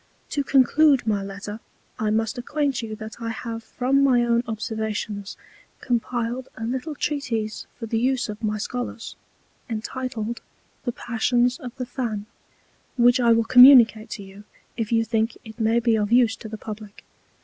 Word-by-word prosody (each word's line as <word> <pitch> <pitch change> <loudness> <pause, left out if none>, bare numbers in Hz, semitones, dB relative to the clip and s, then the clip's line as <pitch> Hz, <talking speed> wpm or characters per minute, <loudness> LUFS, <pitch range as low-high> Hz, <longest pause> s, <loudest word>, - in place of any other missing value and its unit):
To 285 - 0
conclude 275 +1 +4
my 210 -3 +1
Letter, 200 +2 -7 0.4
I 215 -1 0
must 225 +3 0
acquaint 280 0 -1
you 220 -1 -5
that 220 +1 -9
I 230 - -3
have 230 0 -5
from 265 +4 +1
my 245 -3 +4
own 235 0 +2
Observations 220 -2 -4 0.4
compiled 240 0 -2
a 220 - -6
little 260 +6 -3
Treatise 235 -8 -3
for 230 - -6
the 225 0 -1
use 255 +1 +1
of 210 -1 -7
my 215 0 0
Scholars, 245 +2 -5 0.5
entitled 235 0 -4 0.4
The 245 - 0
Passions 240 +1 0
of 245 -1 -8
the 255 -1 -4
Fan; 240 -5 -4 0.7
which 245 +1 +5
I 235 -1 +4
will 230 0 +4
communicate 240 -2 +7
to 200 - -9
you, 195 +1 -13 0.3
if 225 -2 -3
you 225 -1 +3
think 225 +1 0
it 220 +1 -11
may 225 +1 +3
be 230 -1 +2
of 210 0 -1
use 240 -2 +4
to 220 - -9
the 220 - -6
Publick. 210 -1 -9
230 Hz, 165 wpm, -24 LUFS, 220-250 Hz, 0.7 s, communicate